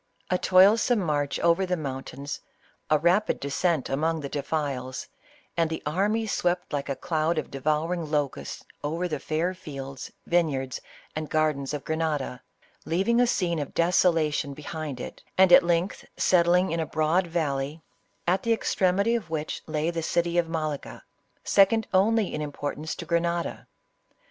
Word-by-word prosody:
A 180 Hz, -, +3 dB
toilsome 210 Hz, +6 st, +5 dB
march 145 Hz, -6 st, -1 dB
over 170 Hz, +2 st, +3 dB
the 180 Hz, -1 st, 0 dB
mountains, 140 Hz, -1 st, -5 dB, 0.5 s
a 155 Hz, -, +5 dB
rapid 175 Hz, +7 st, +2 dB
descent 145 Hz, +2 st, 0 dB
among 160 Hz, +4 st, 0 dB
the 140 Hz, -, -5 dB
defiles, 140 Hz, -3 st, -3 dB, 0.5 s
and 165 Hz, -1 st, +2 dB
the 160 Hz, -, -4 dB
army 205 Hz, +8 st, +1 dB
swept 175 Hz, -5 st, -1 dB
like 140 Hz, -1 st, -2 dB
a 140 Hz, -, -1 dB
cloud 160 Hz, +1 st, 0 dB
of 155 Hz, -, -3 dB
devouring 155 Hz, +4 st, -1 dB
locusts 145 Hz, -3 st, -2 dB, 0.2 s
over 165 Hz, +5 st, -1 dB
the 155 Hz, -4 st, -3 dB
fair 160 Hz, +6 st, -1 dB
fields, 135 Hz, -7 st, -8 dB
vine 170 Hz, -2 st, +3 dB
yards 130 Hz, -2 st, -4 dB, 0.3 s
and 155 Hz, -1 st, -4 dB
gardens 150 Hz, -3 st, +1 dB
of 145 Hz, -2 st, -4 dB
Grenada, 155 Hz, -5 st, -2 dB, 0.4 s
leaving 195 Hz, +9 st, +2 dB
a 245 Hz, -, +4 dB
scene 170 Hz, -7 st, 0 dB
of 145 Hz, -, -5 dB
deso 180 Hz, +1 st, +4 dB
lation 150 Hz, -3 st, -1 dB
behind 150 Hz, -2 st, -5 dB
it, -, -, -7 dB, 0.2 s
and 190 Hz, -1 st, +6 dB
at -, -, +10 dB
length 170 Hz, +2 st, 0 dB
settling 180 Hz, 0 st, +4 dB
in 165 Hz, -, -1 dB
a 160 Hz, -, -1 dB
broad 160 Hz, +4 st, +1 dB
val 160 Hz, -5 st, 0 dB
ley, 145 Hz, +4 st, -5 dB, 0.4 s
at 185 Hz, +2 st, +2 dB
the 230 Hz, -, +2 dB
extremity 200 Hz, 0 st, +1 dB
of 225 Hz, -8 st, -2 dB
which 155 Hz, -1 st, -3 dB
lay 155 Hz, +1 st, 0 dB
the 165 Hz, -1 st, -3 dB
city 170 Hz, +1 st, +1 dB
of 165 Hz, -1 st, 0 dB
Malaga, 155 Hz, -3 st, -4 dB, 0.4 s
second 220 Hz, +3 st, +4 dB
in 200 Hz, -4 st, +2 dB
importance 145 Hz, +1 st, -4 dB
only -, -, -9 dB
to 170 Hz, -, -6 dB
Grenada. 170 Hz, 0 st, -1 dB
160 Hz, 160 wpm, -26 LUFS, 150-180 Hz, 0.5 s, at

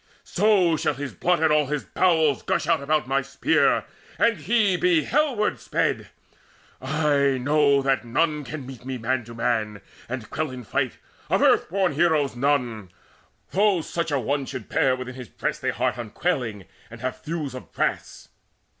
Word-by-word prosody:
So 195 Hz, -6 st, +3 dB
shall 150 Hz, -, 0 dB
his 140 Hz, 0 st, -5 dB
blood 175 Hz, -1 st, +1 dB
and 155 Hz, -1 st, +4 dB
all 150 Hz, -2 st, +3 dB
his 150 Hz, 0 st, -2 dB
bowels 160 Hz, -6 st, +2 dB
gush -, -, -1 dB
out 155 Hz, -, +2 dB
About 150 Hz, +1 st, 0 dB
my 135 Hz, +1 st, +1 dB
spear, 140 Hz, -, +1 dB, 0.3 s
and 230 Hz, -1 st, +3 dB
he 205 Hz, +2 st, +2 dB
be 175 Hz, -3 st, +3 dB
hellward 260 Hz, -6 st, +1 dB
sped! -, -, -1 dB, 0.7 s
I 140 Hz, -1 st, +1 dB
know 140 Hz, +1 st, +3 dB
that 135 Hz, -1 st, +1 dB
none 150 Hz, +5 st, 0 dB
can 140 Hz, 0 st, -7 dB
meet 130 Hz, -2 st, -10 dB
me 130 Hz, 0 st, -4 dB
man 120 Hz, +2 st, -1 dB
to 115 Hz, 0 st, -10 dB
man 110 Hz, -3 st, -1 dB, 0.3 s
And 120 Hz, -3 st, -6 dB
quell 155 Hz, -1 st, -2 dB
in 130 Hz, -1 st, -8 dB
fight -, -, -2 dB, 0.3 s
of -, -, +2 dB
earth -, -, +4 dB
born 190 Hz, 0 st, +1 dB
heroes 155 Hz, -6 st, +2 dB
none, 120 Hz, -7 st, 0 dB, 0.6 s
Though 195 Hz, -2 st, +3 dB
such 165 Hz, 0 st, -3 dB
an 140 Hz, -3 st, 0 dB
one 140 Hz, 0 st, -1 dB
should 130 Hz, -5 st, -7 dB
bear 130 Hz, -1 st, +2 dB
within 130 Hz, 0 st, -7 dB
his 125 Hz, -4 st, -9 dB
breast -, -, -4 dB
A -, -, +1 dB
heart -, -, -1 dB
unquailing, 115 Hz, -, -2 dB, 0.2 s
and 120 Hz, 0 st, -11 dB
have 130 Hz, 0 st, -4 dB
thews 155 Hz, -4 st, -4 dB
of 130 Hz, -, -10 dB
brass. -, -, -3 dB
140 Hz, 170 wpm, -24 LUFS, 130-165 Hz, 0.7 s, and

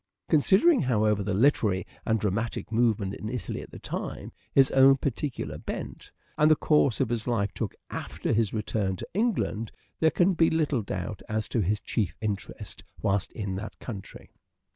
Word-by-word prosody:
Considering, 195 Hz, -, +5 dB
however, 110 Hz, -6 st, +2 dB
the 100 Hz, +1 st, -2 dB
literary 105 Hz, -5 st, +3 dB, 0.2 s
and 110 Hz, -1 st, +2 dB
dramatic 110 Hz, +3 st, -2 dB
movement 110 Hz, -4 st, +1 dB
in 105 Hz, -, -5 dB
Italy 125 Hz, 0 st, -4 dB
at -, -, -11 dB
the -, -, -10 dB
time, -, -, -5 dB, 0.2 s
his 135 Hz, -1 st, +5 dB
own 135 Hz, 0 st, +7 dB
particular 140 Hz, 0 st, -3 dB
bent, -, -, -6 dB, 0.3 s
and 150 Hz, +1 st, +6 dB
the 155 Hz, -, +7 dB
course 150 Hz, -6 st, +3 dB
his 115 Hz, 0 st, -1 dB
life 100 Hz, -5 st, 0 dB
took -, -, -4 dB, 0.2 s
after -, -, -3 dB
his 110 Hz, -2 st, +2 dB
return 105 Hz, -3 st, -1 dB
to -, -, -7 dB
England, 185 Hz, -, 0 dB, 0.3 s
there 160 Hz, -, +5 dB
can 180 Hz, +4 st, +3 dB
be 165 Hz, -1 st, +4 dB
little 150 Hz, -6 st, +1 dB
doubt 100 Hz, 0 st, -5 dB
as 110 Hz, -1 st, -1 dB
to 115 Hz, -, 0 dB
his 105 Hz, +3 st, 0 dB
chief 105 Hz, -2 st, -2 dB
interest 105 Hz, -3 st, -5 dB, 0.2 s
whilst 100 Hz, -1 st, +1 dB
in 100 Hz, -4 st, -3 dB
that 110 Hz, +3 st, -7 dB
country. 100 Hz, -6 st, -9 dB
115 Hz, 165 wpm, -27 LUFS, 105-140 Hz, 0.3 s, own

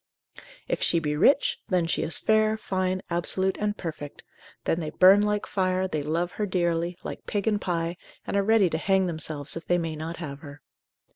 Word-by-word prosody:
If -, -, -2 dB
she 170 Hz, -, +3 dB
be 150 Hz, -2 st, -1 dB
rich, 270 Hz, -, +3 dB
then 180 Hz, -4 st, +1 dB
she 165 Hz, -, -1 dB
is 165 Hz, -, +2 dB
fair, 215 Hz, 0 st, +2 dB
fine, 185 Hz, -2 st, -2 dB
absolute 190 Hz, +2 st, +1 dB
and 210 Hz, 0 st, -1 dB
perfect, 150 Hz, -4 st, -7 dB, 0.4 s
then 165 Hz, -, 0 dB
they 155 Hz, -2 st, -3 dB
burn 190 Hz, +5 st, +6 dB
like 210 Hz, 0 st, 0 dB
fire, 185 Hz, -1 st, 0 dB
they 155 Hz, -5 st, -2 dB
love 165 Hz, +4 st, -1 dB
her 210 Hz, -, -3 dB
dearly, 175 Hz, -1 st, -1 dB
like -, -, -8 dB
pig 205 Hz, -2 st, -2 dB
and 210 Hz, -2 st, +1 dB
pie, 170 Hz, -1 st, -2 dB, 0.3 s
and -, -, -3 dB
are 200 Hz, -, +3 dB
ready 215 Hz, -1 st, +4 dB
to 160 Hz, -, -1 dB
hang 190 Hz, +1 st, +2 dB
themselves 155 Hz, -4 st, -1 dB
if 165 Hz, -, -7 dB
they 175 Hz, -, +3 dB
may 165 Hz, -2 st, -3 dB
not 160 Hz, +2 st, -6 dB
have 145 Hz, -5 st, -7 dB
her. 145 Hz, -2 st, -12 dB
175 Hz, 200 wpm, -26 LUFS, 160-195 Hz, 0.4 s, burn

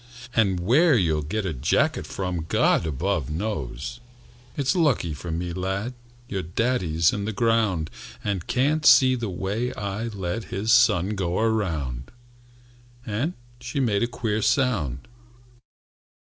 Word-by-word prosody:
And 100 Hz, -5 st, +2 dB
where 135 Hz, -, +4 dB
you'll 80 Hz, -6 st, +1 dB
get 95 Hz, +8 st, -3 dB
a 90 Hz, -, -1 dB
jacket 130 Hz, -, +1 dB
from 90 Hz, -4 st, -3 dB
God 80 Hz, -, +3 dB
above 80 Hz, 0 st, -1 dB
knows. 80 Hz, -, -4 dB, 0.6 s
"It's 140 Hz, +5 st, +1 dB
lucky 135 Hz, -, +2 dB
for 85 Hz, +4 st, -7 dB
me, 85 Hz, +1 st, -3 dB
lad, 95 Hz, +6 st, -2 dB, 0.3 s
Your 95 Hz, -2 st, -3 dB
daddy's 85 Hz, -4 st, +1 dB
in 100 Hz, -1 st, -2 dB
the 110 Hz, -, -2 dB
ground, 110 Hz, -7 st, +1 dB, 0.3 s
And 100 Hz, -4 st, -2 dB
can't 145 Hz, +5 st, +1 dB
see 130 Hz, -3 st, +7 dB
the 120 Hz, -4 st, -2 dB
way 100 Hz, +7 st, -2 dB
I 100 Hz, +2 st, -3 dB
let 100 Hz, 0 st, -4 dB
His 105 Hz, +4 st, -2 dB
son 110 Hz, -7 st, +5 dB
go 95 Hz, -4 st, -1 dB
around!" 80 Hz, -, -1 dB, 1.0 s
And 120 Hz, +11 st, -2 dB, 0.2 s
she 140 Hz, -, -4 dB
made 110 Hz, -6 st, +1 dB
a 120 Hz, -, +2 dB
queer 115 Hz, -3 st, -2 dB
sound. 95 Hz, -, 0 dB
100 Hz, 135 wpm, -25 LUFS, 85-120 Hz, 1.0 s, see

